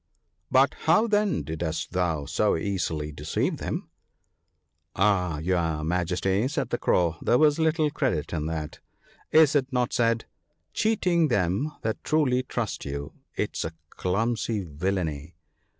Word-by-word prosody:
* - - -48
But - - +5
how 220 - +5
then 205 - +1
didst 80 +2 -3
thou 85 -5 0
so 80 +8 +1
easily 80 -5 -2
deceive 75 - -2
them? - - -4 0.3
' - - -48 0.2
' - - -50
Ah! 90 -5 +2
your 80 -2 0
Majesty/ 90 +6 0
said 145 - -2
the - - 0
Crow, 85 -2 +2
* - - -28
there 120 - +3
was 150 +1 +4
little 160 -1 +2
credit 130 - -1
in 80 -2 -2
that. 80 -2 -4 0.5
Is 155 -2 +6
it 135 -3 +1
not 125 -2 0
said? 115 -1 +1
— - - -48
" - - -47
Cheating 180 -7 +2
them 100 - 0
that 110 -1 -2
truly 135 -5 +2
trust 120 -4 -3
you, 70 0 -5 0.2
'tis - - -2
a 80 - -4 0.2
clumsy 110 +2 -1
villainy 80 -1 -3
95 Hz, 155 wpm, -26 LUFS, 80-130 Hz, 0.5 s, Is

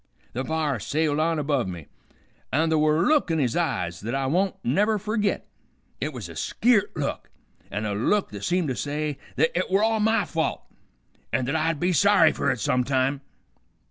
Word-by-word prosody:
The 130 - -2
b'ar 155 -4 -1
sailed 150 +5 0
on 165 +1 +1
above 140 -6 0
me, 85 -5 -7 0.7
an' 160 +3 +2
th' 160 - +3
were 155 +2 +3
a - - +2
look 300 - +3
in 165 - +1
his 125 -6 0
eyes 100 - -1
th't 115 +5 -3
I 135 0 0
won't 180 +8 +1
never 205 - +2
fergit. 210 0 -1 0.6
It - - -2
was - - -7
a - - -11
skeert 220 -4 +1
look, 145 -2 -3 0.4
an' 105 +2 -3
a 105 - -1
look 190 - +1
that 100 -1 -7
seemed 175 -3 0
to 130 - -1
say 150 +1 -3 0.2
th't 160 - +3
it 180 - 0
were 195 +3 +3
all 220 0 +2
my 220 -1 +2
fault, 160 -1 -2 0.7
an' 125 +1 0
th't 135 +5 -1
I'd 160 -1 0
be 180 +2 +1
sorry 200 -3 +5
fer - - -1
it - - 0
some 125 +4 +1
time. 135 +1 0
155 Hz, 200 wpm, -25 LUFS, 130-185 Hz, 0.7 s, sorry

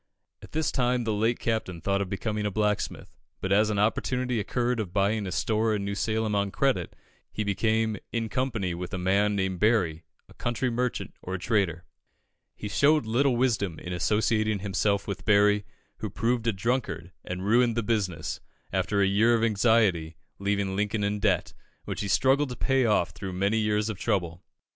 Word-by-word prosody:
At - - -13
this 155 0 0
time 125 -1 +1
the 110 -1 -1
late 110 +3 +1
Captain 110 -6 -2
thought 100 +4 0
of 95 - -3
becoming 105 +2 -2
a - - 0
blacksmith, 105 0 -2 0.2
but 95 - -3
as 105 +2 +4
an 105 - -1
opportunity 125 +3 0
occurred 120 +3 -1
of 100 -5 -3
buying 100 +1 +1
a - - -4
store 110 +2 +1
in 100 -1 -3
New 100 - -2
Salem 110 +1 -1
on 100 0 +1
credit, 135 +6 0 0.4
he 110 - -2
became, 110 +2 +1
in 115 -1 -1
company 110 -7 -1
with 90 +1 -5
a - - -2
man 100 +3 +2
named 95 -2 -1
Berry, 95 -8 +2 0.2
a - - -17
country 120 +1 -1
merchant, 125 +1 -2
or 95 +1 -4
trader. 95 -5 0 0.7
He 105 - -6
showed 145 +5 +3
little 125 +4 +2
wisdom 105 -9 0
in 90 - -6
associating 110 +4 +1
himself 100 0 0
with 100 0 -4
Berry, 105 -1 +4 0.3
who - - -4
proved 120 0 -1
a - - +4
drunkard, 95 -5 -2
and 90 +1 -5
ruined 120 +2 +3
the 115 - +1
business, 95 -8 -1 0.3
after 95 +2 +1
a - - +5
year 110 +5 +4
of 115 - 0
anxiety, 105 -7 +2 0.2
leaving 100 -1 0
Lincoln 105 +1 0
in 100 +1 0
debt, - - +1 0.3
which - - -4
he 100 - -2
struggled 135 +7 +3
to 125 - -5
pay 135 +1 +2
off 95 -6 +2
through 95 0 -6
many 100 +4 +1
years 105 0 +1
of 110 -4 -4
trouble. 85 -3 -1
105 Hz, 185 wpm, -27 LUFS, 95-115 Hz, 0.7 s, a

